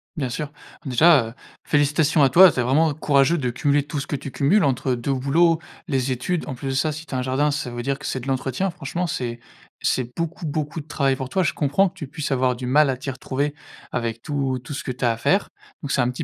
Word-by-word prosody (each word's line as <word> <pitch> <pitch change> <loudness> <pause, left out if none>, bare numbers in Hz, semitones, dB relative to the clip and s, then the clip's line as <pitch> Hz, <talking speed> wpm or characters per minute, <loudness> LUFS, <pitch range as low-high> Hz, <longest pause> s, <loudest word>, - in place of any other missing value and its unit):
Bien 140 -6 -2
sûr. 150 +4 -4 0.3
Déjà, 135 0 +5
heu, 115 - -9 0.3
félicitations 150 +1 +2
à 135 - +5
toi. 180 +6 +8
C'est 125 - -1
vraiment 150 +6 +3
courageux 145 +2 +3
de 125 -5 -1
cumuler 140 +3 +1
tout 145 0 -4
ce 140 - -5
que - - -2
tu 140 -1 -6
cumules 170 +8 +3
entre 130 -2 +1
2 130 +3 -2
boulots, 160 +6 +3 0.3
les 135 -4 0
études. 155 +7 -2
En 135 - -4
plus 135 +2 -5
de - - -1
ça, 140 +4 +1
si 155 +2 -7
tu - - -10
as 130 - 0
un - - -1
jardin, 135 +4 +1
ça 145 -3 -3
veut 120 0 -5
dire 140 +2 -1
que - - -9
c'est 130 - -2
de 125 - -9
l'entretien. 135 +7 -1
Franchement, 170 +3 -4
c'est 120 -7 -3 0.4
c'est 125 -2 0
beaucoup, 165 0 -3
beaucoup 150 +1 -3
de 145 - -17
travail 135 -3 +1
pour 130 -1 -5
toi. 190 +4 +1
Je 160 - 0
comprends 150 +7 +2
que 175 - -8
tu 150 - -7
puisses 145 0 -5
avoir 130 -1 +2
du 125 +1 -6
mal 145 +3 +4
à 130 - -1
t'y 135 +2 -4
retrouver 140 +2 -2 0.4
avec 115 -1 -3
tout 140 -3 -1
tout 145 - -7
ce 135 - -5
que - - -3
tu 125 0 -3
as 120 - +4
à 115 - -3
faire. 195 - +1 0.3
Donc 140 - -3
c'est 130 - +2
un 120 - +1
petit 125 - -4
140 Hz, 260 wpm, -23 LUFS, 130-155 Hz, 0.4 s, toi